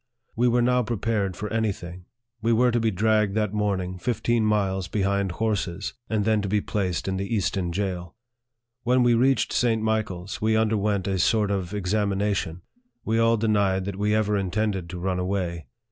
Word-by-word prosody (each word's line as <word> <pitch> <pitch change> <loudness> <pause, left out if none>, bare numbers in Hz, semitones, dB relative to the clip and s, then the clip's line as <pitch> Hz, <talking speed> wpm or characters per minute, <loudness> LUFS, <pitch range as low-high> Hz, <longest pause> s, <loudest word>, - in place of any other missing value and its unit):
We 120 +2 +2
were 120 0 +3
now 125 +1 +3
prepared 110 -4 -1
for 105 - -4
any 110 -2 +1
thing. 90 -1 -9 0.4
We 115 +1 +2
were 125 +2 +4
to 120 - +1
be 115 0 +2
dragged 105 0 +1
that 105 -2 0
morning 95 -3 -1
fifteen 115 +1 0
miles 95 -4 +1
behind 100 -1 0
horses, 100 -3 -2 0.2
and 105 -2 0
then 110 -1 +2
to 100 - -3
be 105 +1 +2
placed 95 -4 -2
in 95 0 -1
the 100 +4 -2
Easton 95 -3 -1
jail. 90 -2 -3 0.7
When 125 +1 +3
we 120 -1 +4
reached 130 +3 +2
St. 115 -2 +2
Michael's, 105 -4 -2
we 110 0 +2
underwent 105 -3 +1
a 95 -1 0
sort 105 +3 +2
of 95 -3 -2
examination. 100 -3 -1 0.4
We 110 +1 +1
all 115 0 +4
denied 100 -4 +1
that 100 -1 -4
we 105 +1 +2
ever 105 -1 +1
intended 95 -2 -1
to 90 - -6
run 90 0 -1
away. 90 -3 -2
105 Hz, 180 wpm, -25 LUFS, 95-110 Hz, 0.7 s, were